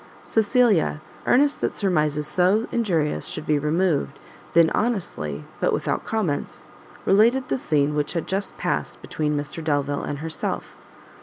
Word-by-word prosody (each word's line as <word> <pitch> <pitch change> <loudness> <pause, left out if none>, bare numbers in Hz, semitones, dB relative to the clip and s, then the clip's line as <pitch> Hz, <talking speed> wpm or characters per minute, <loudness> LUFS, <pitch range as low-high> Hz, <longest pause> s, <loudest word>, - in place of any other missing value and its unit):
Cecilia, 220 - +2 0.3
earnest 285 +3 +3
that - - -1
surmises 150 -6 +1
so 185 +8 +2
injurious 170 -10 0
should - - -5
be 150 -1 +2
removed, 150 -2 0 0.4
then 165 -1 +5
honestly, 170 - -2 0.2
but - - +1
without - - -1
comments, 195 -10 -2 0.4
related 235 +6 +4
the - - 0
scene 150 - +1
which 150 -1 -1
had 170 -3 -2
just 195 +2 -2
past - - -2
between 150 -1 -1
Mr 145 +3 -5
Delvile 145 -2 0
and 145 - -4
herself. 160 +2 -4
165 Hz, 140 wpm, -24 LUFS, 150-210 Hz, 0.4 s, then